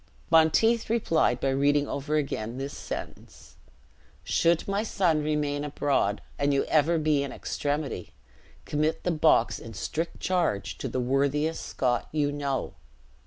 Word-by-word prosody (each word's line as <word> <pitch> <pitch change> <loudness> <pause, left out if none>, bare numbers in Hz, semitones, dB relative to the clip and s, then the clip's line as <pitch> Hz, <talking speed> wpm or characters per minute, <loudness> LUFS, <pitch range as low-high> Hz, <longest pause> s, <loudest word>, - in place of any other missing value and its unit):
Monteith 215 +9 +4
replied 165 - +2
by 135 - 0
reading 145 +1 +2
over 145 +2 -2
again 125 -6 -2
this 135 +1 -5
sentence - - -8 0.7
"'Should 170 0 +2
my 200 +1 0
son 180 -8 +1
remain 150 -1 -1
abroad, 140 -8 0 0.2
and 140 0 +2
you 140 - +2
ever 160 +2 +3
be 155 -2 +2
in 140 -2 -3
extremity, 145 - -3 0.5
commit 155 +2 -1
the 180 - +1
box 155 -7 +3
in 115 -1 -10
strict 160 - -3
charge 175 - -1
to - - -3
the 130 - -2
worthiest 140 +5 0
Scot 125 -2 -1
you 145 -2 +1
know.' 140 -2 -2
145 Hz, 140 wpm, -27 LUFS, 135-160 Hz, 0.7 s, Monteith